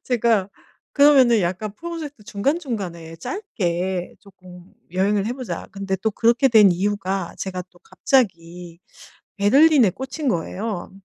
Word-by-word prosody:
제가 230 -5 +1 0.4
그러면은 270 -6 +5
약간 185 +4 -3
'프로젝트 315 -8 -7
중간중간에 200 - -3
짧게 180 - -3
쪼끔 180 -3 -16 0.3
여행을 195 +3 0
해 235 - -1
보자.' 255 -1 -6
근데 195 -1 -4
또 220 +4 -1
그렇게 235 +5 +3
된 215 -6 +6
이유가 195 -1 -2
제가 185 -1 -4
또 175 - -23
갑자기 175 -8 -2 0.6
베를린에 260 +3 +5
꽂힌 265 - -6
거예요. 195 0 -3
205 Hz, 285 characters per minute, -22 LUFS, 180-255 Hz, 0.6 s, 된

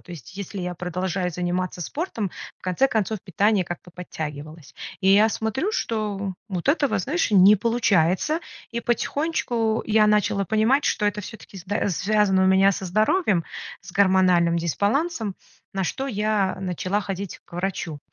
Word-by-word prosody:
То 175 - -12
есть 160 - -11
если 200 0 -6
я 180 0 -3
продолжаю 180 +1 -2
заниматься 180 +1 -2
спортом, 225 - -3 0.3
в - - -41
конце 185 +8 +2
концов 220 -3 -1
питание 200 +2 +2
как-то 175 +1 -8
подтягивалось. 155 -3 -7 0.3
И 190 - +2
я 205 +3 +6
смотрю, 225 - -2
что 205 - -2
вот 185 0 -4
этого, 280 - +2
знаешь 305 - 0
не 200 +2 +7
получается. 225 - +2 0.3
И 235 - -3
потихонечку 240 -3 0
я 215 -1 +4
начала 210 -1 +2
понимать, 220 +8 +2
что 210 -1 +1
это 205 0 -1
всё-таки 205 -1 -11
зд 195 +2 -1
связано 195 +1 +2
у - - +4
меня 190 +1 +5
со 190 - -5
здоровьем, 215 - +2 0.4
с - - -12
гормональным 185 -3 +4
дисбалансом, 205 - 0 0.4
на 195 - 0
что 270 +8 -3
я 210 -4 0
начала 185 +2 -1
ходить 195 -1 -5
к - - -16
врачу. 175 -4 -3
200 Hz, 150 wpm, -24 LUFS, 180-220 Hz, 0.4 s, не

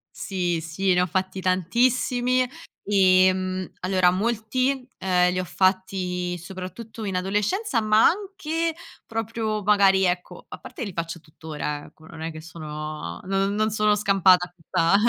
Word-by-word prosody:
Sì, 175 -4 -2
sì 180 +4 0
ne 180 - +3
ho - - +2
fatti 190 +1 -2
tantissimi. 245 +7 +2 0.5
Ehm, 185 -1 +3
allora 185 -1 +3
molti, 240 +6 -1
ehm, 180 -1 +2
li 185 - -1
ho - - -1
fatti 180 -1 0
soprattutto 190 +6 -8
in 195 -2 -3
adolescenza, 210 - 0
ma 215 0 +4
anche 335 -4 -1 0.3
proprio 225 -1 -3
magari 195 -1 +4
ecco 180 0 -3
a - - -8
parte - - -11
che - - -3
li 195 - -7
faccio 170 0 -4
tuttora, 150 -2 -6
ecco, 155 - -18
non 160 0 -11
è 165 +1 -3
che 155 - -9
sono 155 - -7
non 195 +1 0
non 215 +1 +1
sono 210 0 +3
scampata 195 -3 +4
a 175 - -28
questa 170 +1 +1
190 Hz, 150 wpm, -24 LUFS, 180-215 Hz, 0.5 s, ma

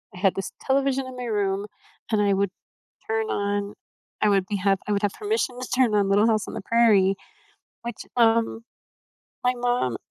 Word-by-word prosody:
I - - -9
had 190 0 +3
this 195 - -4
television 270 0 +1
in 255 - -8
my 250 - -4
room 200 -3 0 0.5
and 215 -2 +3
I 200 -1 +3
would 195 -1 +1 0.6
turn 445 0 -1
on 205 0 -1 0.5
I 210 - +4
would 195 -2 +3
be 205 - -1
I 195 +1 +1
would 200 - 0
have 205 - +2
permission 415 - -2
to 255 - -5
turn 250 -4 +3
on 200 -1 +3
Little 205 +3 +4
House 215 -2 +1
on - - -7
the 225 - -4
Prairie, 205 -3 +4 0.7
which, 235 -1 -6
um, 230 -1 +3 0.8
my 250 - +4
mom, 245 - 0
215 Hz, 185 wpm, -25 LUFS, 200-245 Hz, 0.8 s, I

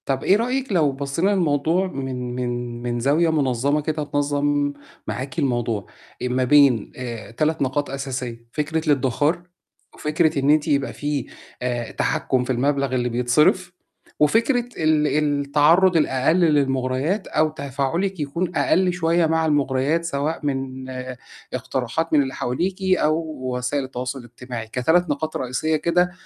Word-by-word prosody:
طَب 135 -1 -1
إيه 195 - +5
رأيِك 255 +2 -1
لو 160 -7 +3
بصّينا 140 +7 -1
للموضوع 170 0 +1
من 130 -5 -5
من 120 -1 -3
من 120 0 -2
زاوية 150 +7 +2
مُنظّمة 140 -1 +1
كده 155 0 -2
تنظّم 145 0 0 0.3
معاكِ 135 +5 -4
الموضوع، 120 -7 -1 0.4
آآ - - -1
ما 125 +1 0
بين 135 -4 +4
آآ 120 -5 -6
3 155 +7 0
نقاط 140 +2 0
أساسية، 130 -4 -5
فكرة 155 +2 -2
الإدِّخار 145 +4 +1 0.5
وفكرة 155 0 +1
إن 135 +1 +1
أنتِ 150 0 +3
يبقى 140 -1 +1
في 145 -3 -2 0.4
آآ 120 -2 -2
تحكُّم 130 -1 0
في 125 - -9
المبلغ 140 +1 0
اللي 125 -1 0
بيتصرف 125 +9 +2 0.5
وفكرة 235 - +2
ال 155 -1 +2
التعرُّض 150 +5 +3
الأقل 140 0 +2
للمُغرَيات 140 +2 +1
أو 155 0 +2
تفاعُلِك 150 +6 -2
يكون 170 +5 -2
أقل 185 -1 +2
شوية 170 -1 +2
مع 160 0 +1
المُغرَيات 145 +2 +1
سواء 155 +1 -2
من 130 -2 -3 0.6
اقتراحات 130 +5 -2
من 150 - +6
اللي 135 -1 -5
حواليكِ 180 +10 -2 0.2
أو 155 +1 +2 0.4
وسائل 130 +3 -1
التواصل 130 0 -5
الاجتماعي، 120 -1 -8
ك3 160 +9 +1
نقاط 155 +2 -2
رئيسية 130 +5 -1
كده، 175 +3 +2
145 Hz, 140 wpm, -22 LUFS, 130-160 Hz, 0.6 s, من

